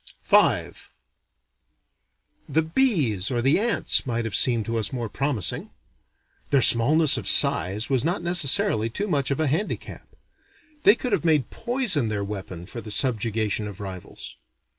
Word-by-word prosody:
V -, -, +3 dB, 1.8 s
The 160 Hz, -, +1 dB
bees 160 Hz, -, 0 dB
or 120 Hz, -, -2 dB
the 135 Hz, +8 st, +2 dB
ants 230 Hz, +2 st, +1 dB
might 120 Hz, -2 st, -3 dB
have 110 Hz, -, -5 dB
seemed 115 Hz, -4 st, +1 dB
to 115 Hz, +1 st, -2 dB
us 110 Hz, -, -2 dB
more 120 Hz, -4 st, -5 dB
promising. 135 Hz, -, -3 dB, 0.8 s
Their 140 Hz, -3 st, +3 dB
smallness 140 Hz, +5 st, +5 dB
of 105 Hz, -, -7 dB
size 100 Hz, +8 st, +2 dB
was 130 Hz, -3 st, 0 dB
not 175 Hz, +3 st, -2 dB
necessarily 175 Hz, -, +3 dB
too 205 Hz, -, -4 dB
much 140 Hz, -8 st, -1 dB
of 140 Hz, -, -2 dB
a 160 Hz, -, +1 dB
handicap. 160 Hz, +9 st, -4 dB, 0.8 s
They 205 Hz, -, +7 dB
could 250 Hz, 0 st, -5 dB
have -, -, 0 dB
made 155 Hz, -7 st, +1 dB
poison 235 Hz, -, -1 dB
their 105 Hz, -2 st, -3 dB
weapon 95 Hz, -4 st, -7 dB
for 115 Hz, +5 st, -8 dB
the 110 Hz, -, -10 dB
subjugation 110 Hz, -3 st, -1 dB
of 100 Hz, -3 st, -10 dB
rivals. 95 Hz, -3 st, -9 dB
125 Hz, 150 wpm, -23 LUFS, 110-160 Hz, 1.8 s, They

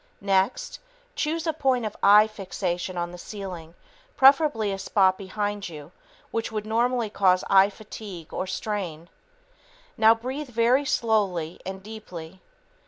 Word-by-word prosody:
Next, 195 Hz, -, 0 dB, 0.4 s
choose 315 Hz, +2 st, -1 dB
a 320 Hz, -, 0 dB
point 265 Hz, -6 st, +1 dB
of 210 Hz, -, -4 dB
eye 210 Hz, +2 st, +7 dB
fixation 185 Hz, -3 st, -4 dB
on 175 Hz, 0 st, -2 dB
the 180 Hz, -, -10 dB
ceiling, 180 Hz, -5 st, -8 dB, 0.4 s
preferably 270 Hz, -6 st, +5 dB
a 195 Hz, -, -4 dB
spot 190 Hz, -1 st, +3 dB
behind 205 Hz, +1 st, -4 dB
you 150 Hz, -1 st, -10 dB, 0.4 s
which 230 Hz, 0 st, -2 dB
would 215 Hz, -1 st, -3 dB
normally 235 Hz, 0 st, 0 dB
cause 185 Hz, -3 st, +3 dB
eye 195 Hz, 0 st, +7 dB
fatigue 205 Hz, -5 st, -10 dB
or 185 Hz, -, -3 dB
strain. 185 Hz, -4 st, -4 dB, 0.9 s
Now, 225 Hz, +1 st, +6 dB
breathe 260 Hz, +5 st, -5 dB
very 245 Hz, +4 st, +2 dB
slowly 195 Hz, -, 0 dB
and 190 Hz, 0 st, -6 dB
deeply. 190 Hz, -5 st, -9 dB
205 Hz, 135 wpm, -25 LUFS, 185-230 Hz, 0.9 s, eye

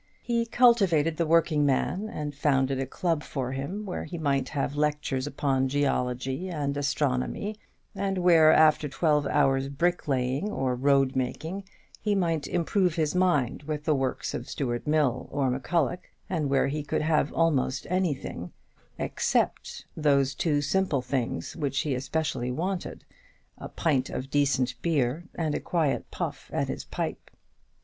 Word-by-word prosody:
He 235 Hz, -1 st, 0 dB
cultivated 195 Hz, -11 st, +4 dB
the 170 Hz, -, +1 dB
working 160 Hz, -2 st, +3 dB
man, 180 Hz, +9 st, 0 dB
and 150 Hz, -8 st, -4 dB
founded 135 Hz, -2 st, +1 dB
a 135 Hz, -, -2 dB
club 165 Hz, +2 st, -1 dB
for 130 Hz, -4 st, -4 dB
him, 145 Hz, +11 st, -4 dB
where 185 Hz, -, -4 dB
he 175 Hz, -, -6 dB
might 140 Hz, -4 st, 0 dB
have 140 Hz, -1 st, -2 dB
lectures 150 Hz, -2 st, 0 dB
upon 135 Hz, -2 st, 0 dB
geology 135 Hz, +3 st, -1 dB
and 145 Hz, -4 st, -2 dB
astronomy, 145 Hz, -, -1 dB, 0.3 s
and 195 Hz, -1 st, -2 dB
where, 170 Hz, -3 st, +6 dB
after 155 Hz, -2 st, +4 dB
twelve 150 Hz, 0 st, +1 dB
hours' 135 Hz, -2 st, +2 dB
bricklaying 140 Hz, 0 st, 0 dB
or 130 Hz, -10 st, -1 dB
road 135 Hz, +1 st, +2 dB
making, 160 Hz, +9 st, -3 dB, 0.4 s
he 210 Hz, -1 st, +1 dB
might 165 Hz, -6 st, 0 dB
improve 180 Hz, 0 st, +1 dB
his 155 Hz, -3 st, 0 dB
mind 175 Hz, -11 st, +1 dB
with 150 Hz, 0 st, -4 dB
the 155 Hz, -, +2 dB
works 135 Hz, -2 st, -2 dB
of 120 Hz, +3 st, -5 dB
Stuart 120 Hz, -4 st, -3 dB
Mill 150 Hz, -4 st, +1 dB
or 135 Hz, -3 st, +1 dB
M'Culloch, 165 Hz, +6 st, -1 dB, 0.2 s
and 155 Hz, -6 st, -1 dB
where 135 Hz, 0 st, +3 dB
he 150 Hz, +2 st, -2 dB
could 150 Hz, -, -2 dB
have 155 Hz, -2 st, +2 dB
almost 140 Hz, -5 st, +1 dB
anything; 155 Hz, -, -2 dB, 0.5 s
except -, -, -1 dB
those 140 Hz, -3 st, +2 dB
two 145 Hz, 0 st, 0 dB
simple 150 Hz, -4 st, +1 dB
things 120 Hz, -12 st, -2 dB
which 140 Hz, -3 st, -1 dB
he 145 Hz, -, -1 dB
especially 130 Hz, -1 st, -2 dB
wanted, 180 Hz, +8 st, -3 dB, 0.5 s
a -, -, -7 dB
pint 140 Hz, -6 st, 0 dB
of 135 Hz, +1 st, -5 dB
decent 140 Hz, -3 st, +2 dB
beer 150 Hz, -1 st, 0 dB
and 160 Hz, -3 st, -1 dB
a -, -, -1 dB
quiet 160 Hz, -5 st, -1 dB
puff -, -, -5 dB
at -, -, -1 dB
his -, -, -4 dB
pipe. -, -, -4 dB
145 Hz, 150 wpm, -27 LUFS, 135-170 Hz, 0.5 s, where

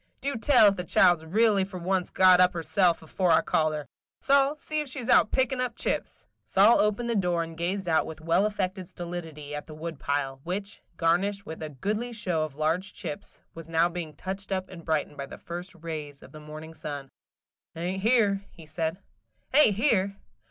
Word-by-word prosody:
Do 280 Hz, -1 st, -2 dB
tell 235 Hz, 0 st, +5 dB
if 200 Hz, -, -3 dB
the 180 Hz, -, -3 dB
child 175 Hz, 0 st, +4 dB
's 160 Hz, -, -13 dB
really 205 Hz, +3 st, +3 dB
for 190 Hz, -1 st, -7 dB
once 180 Hz, +1 st, -1 dB
got 185 Hz, -1 st, +6 dB
up 180 Hz, 0 st, +6 dB
of -, -, -22 dB
herself 170 Hz, 0 st, +1 dB
afore 180 Hz, +3 st, -1 dB
I -, -, +6 dB
called 155 Hz, -1 st, +1 dB
her. 150 Hz, -1 st, -5 dB, 0.3 s
Sol, 280 Hz, +1 st, +3 dB
see 310 Hz, 0 st, -3 dB
if 300 Hz, -, -6 dB
she 260 Hz, -1 st, -5 dB
's 240 Hz, -, -6 dB
out -, -, +5 dB
pickin' 260 Hz, -1 st, +1 dB
up 250 Hz, -2 st, -2 dB
chips!" -, -, -3 dB, 0.2 s
Sol 205 Hz, +5 st, +5 dB
opened 210 Hz, +3 st, +1 dB
the 235 Hz, -, 0 dB
door 175 Hz, -4 st, +1 dB
and 165 Hz, 0 st, -8 dB
gazed 180 Hz, +3 st, -2 dB
out 160 Hz, -2 st, +2 dB
with 160 Hz, 0 st, -8 dB
well 165 Hz, +6 st, +2 dB
affected 190 Hz, -3 st, -3 dB
stolidity 165 Hz, -4 st, -7 dB
at 150 Hz, -, -6 dB
the 155 Hz, -, -9 dB
wood 160 Hz, -1 st, -6 dB
pile, 135 Hz, -2 st, -2 dB
which, 195 Hz, +3 st, -5 dB, 0.2 s
garnished 195 Hz, +5 st, +1 dB
with 160 Hz, -, -8 dB
a 155 Hz, -, -4 dB
goodly 210 Hz, -, -3 dB
show 180 Hz, -8 st, -1 dB
of 155 Hz, -3 st, -6 dB
large 165 Hz, +6 st, -1 dB
chips, 200 Hz, +1 st, -7 dB
was 165 Hz, -1 st, -10 dB
now 165 Hz, +1 st, +3 dB
being 170 Hz, -4 st, -6 dB
touched 195 Hz, +4 st, -6 dB
up 190 Hz, -1 st, -2 dB
and 170 Hz, -3 st, -11 dB
brightened 155 Hz, -2 st, -1 dB
by 140 Hz, -, -5 dB
the -, -, -10 dB
first 175 Hz, +2 st, -7 dB
rays 150 Hz, -3 st, -6 dB
of -, -, -14 dB
the 155 Hz, -, -11 dB
morning 155 Hz, +1 st, -9 dB
sun. 145 Hz, -3 st, -6 dB, 0.7 s
"Ain't 180 Hz, +3 st, -3 dB
here," 210 Hz, -3 st, +3 dB
he 165 Hz, -, -14 dB
said. 160 Hz, +2 st, -2 dB, 0.6 s
"Ain't 265 Hz, -8 st, +6 dB
here? 200 Hz, -5 st, +1 dB
180 Hz, 210 wpm, -27 LUFS, 160-200 Hz, 0.7 s, got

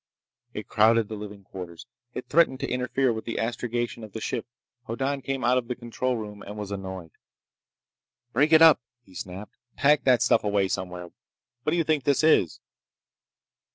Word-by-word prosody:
It -, -, -6 dB
crowded 110 Hz, 0 st, +3 dB
the 110 Hz, -, -4 dB
living 105 Hz, -1 st, -9 dB
quarters. 90 Hz, -3 st, -9 dB, 0.3 s
It 125 Hz, -, -5 dB
threatened 145 Hz, -5 st, +3 dB
to -, -, -1 dB
interfere 125 Hz, 0 st, 0 dB
with 110 Hz, -, -6 dB
the 115 Hz, -, -4 dB
astrogation 120 Hz, 0 st, -2 dB
of 110 Hz, -, -10 dB
the 110 Hz, -, -5 dB
ship. 115 Hz, +2 st, -3 dB, 0.4 s
Hoddan 135 Hz, +4 st, -2 dB
came 135 Hz, -1 st, -3 dB
out 125 Hz, +2 st, +4 dB
of 120 Hz, -, -8 dB
the 125 Hz, -, -3 dB
control 125 Hz, +1 st, -2 dB
room 105 Hz, -2 st, -7 dB
and 105 Hz, +1 st, -8 dB
was 105 Hz, -1 st, -6 dB
annoyed. 95 Hz, -4 st, -6 dB, 1.2 s
"Break 145 Hz, +6 st, +3 dB
it 160 Hz, 0 st, +8 dB
up!" 160 Hz, -3 st, +7 dB, 0.2 s
he 95 Hz, -, -20 dB
snapped. 95 Hz, +3 st, -8 dB, 0.2 s
"Pack 150 Hz, +1 st, +3 dB
that 125 Hz, -3 st, +4 dB
stuff 120 Hz, -, +3 dB
away 100 Hz, -2 st, +1 dB
somewhere! 90 Hz, -2 st, -4 dB, 0.5 s
What 120 Hz, -, -1 dB
do 170 Hz, -, +1 dB
you 165 Hz, -, +2 dB
think 155 Hz, -3 st, 0 dB
this 140 Hz, +1 st, +2 dB
is?" 155 Hz, -, +3 dB
115 Hz, 180 wpm, -26 LUFS, 100-130 Hz, 1.2 s, it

